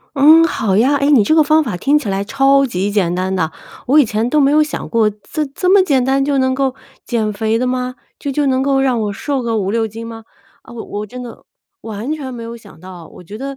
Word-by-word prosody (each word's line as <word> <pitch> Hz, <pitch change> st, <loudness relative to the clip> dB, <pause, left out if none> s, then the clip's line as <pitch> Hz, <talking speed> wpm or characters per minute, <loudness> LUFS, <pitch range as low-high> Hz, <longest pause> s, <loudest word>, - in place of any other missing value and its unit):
嗯， 310 Hz, +4 st, +6 dB
好 210 Hz, -11 st, -1 dB
呀， 255 Hz, +8 st, +3 dB
哎， 280 Hz, 0 st, +1 dB
你 255 Hz, -8 st, +5 dB
这 315 Hz, -, +2 dB
个 315 Hz, -, +5 dB
方 310 Hz, +2 st, +3 dB
法 225 Hz, -10 st, -4 dB
听 280 Hz, +10 st, +2 dB
起 215 Hz, -, -5 dB
来 195 Hz, 0 st, -1 dB
超 275 Hz, +5 st, +3 dB
级 200 Hz, -5 st, -2 dB
简 195 Hz, -4 st, 0 dB
单 185 Hz, +1 st, -2 dB
的， 160 Hz, -3 st, -1 dB, 0.3 s
我 285 Hz, +4 st, +4 dB
以 280 Hz, -, +5 dB
前 215 Hz, +2 st, -1 dB
都 300 Hz, +4 st, +2 dB
没 275 Hz, 0 st, +3 dB
有 305 Hz, +1 st, +4 dB
想 300 Hz, -, -6 dB
过， 230 Hz, -2 st, +2 dB
这 210 Hz, +9 st, -4 dB
这 365 Hz, +1 st, -1 dB
么 390 Hz, -1 st, +6 dB
简 275 Hz, -8 st, +1 dB
单 270 Hz, +1 st, +1 dB
就 280 Hz, -1 st, +1 dB
能 260 Hz, 0 st, +1 dB
够 270 Hz, -1 st, 0 dB, 0.3 s
减 220 Hz, -3 st, -1 dB
肥 220 Hz, +2 st, -1 dB
的 255 Hz, -, 0 dB
吗？ 250 Hz, 0 st, -3 dB, 0.2 s
就 280 Hz, -, -4 dB
就 290 Hz, +1 st, 0 dB
能 260 Hz, 0 st, +1 dB
够 275 Hz, -1 st, +1 dB
让 255 Hz, -4 st, +1 dB
我 205 Hz, -1 st, -2 dB
瘦 275 Hz, +5 st, -3 dB
个 230 Hz, -1 st, -1 dB
5-6 220 Hz, +3 st, -1 dB
斤 225 Hz, +2 st, -8 dB
吗？ 225 Hz, -1 st, -9 dB, 0.4 s
啊， -, -, -14 dB
我 235 Hz, -, -7 dB
我 210 Hz, +1 st, -6 dB
真 250 Hz, +4 st, -9 dB
的 240 Hz, -2 st, -11 dB, 0.4 s
完 220 Hz, +5 st, -6 dB
全 280 Hz, -4 st, -5 dB
没 240 Hz, -, -8 dB
有 230 Hz, +1 st, -7 dB
想 205 Hz, -7 st, -17 dB
到， 180 Hz, -2 st, -11 dB
我 -, -, -15 dB
觉 205 Hz, +5 st, -10 dB
得 275 Hz, +2 st, -6 dB
250 Hz, 270 characters per minute, -17 LUFS, 210-275 Hz, 0.4 s, 嗯